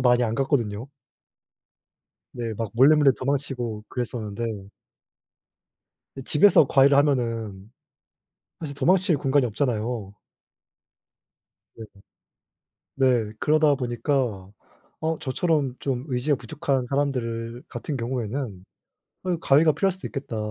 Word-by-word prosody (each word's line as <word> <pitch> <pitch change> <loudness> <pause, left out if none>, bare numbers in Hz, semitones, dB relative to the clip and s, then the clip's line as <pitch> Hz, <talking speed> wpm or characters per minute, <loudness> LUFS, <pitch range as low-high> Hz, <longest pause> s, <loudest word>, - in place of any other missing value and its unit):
많이 125 -1 +4
안 110 -1 -1
갔거든요. 120 -4 -1 1.5
네. 115 -2 -4
막 110 -1 -4
몰래몰래 140 +3 +6
도망치고 130 -5 -3
그랬었는데 110 -4 -4 1.5
근데 135 - -7
집에서 160 -1 +6
과외를 135 +1 +5
하면은 115 -8 0 0.9
사실 150 -4 -5
도망칠 180 +4 +3
공간이 135 -1 +2
없잖아요. 110 -3 -2 1.6
네. 115 - -9 1.1
네. 125 -5 +2
그러다 155 +1 +3
보니까 120 -5 -2 0.5
어 160 0 -1
저처럼 140 -2 0
좀 130 -2 -3
의지가 135 +3 0
부족한 140 -3 -2
사람들을 120 -4 -2
같은 150 - -5
경우에는 120 -4 -4 0.6
'어 180 -2 0
과외가 155 +3 +4
필요할 190 +6 +1
수도 190 0 -8
있겠다.' 135 -5 -6
130 Hz, 250 characters per minute, -24 LUFS, 115-145 Hz, 1.6 s, 몰래몰래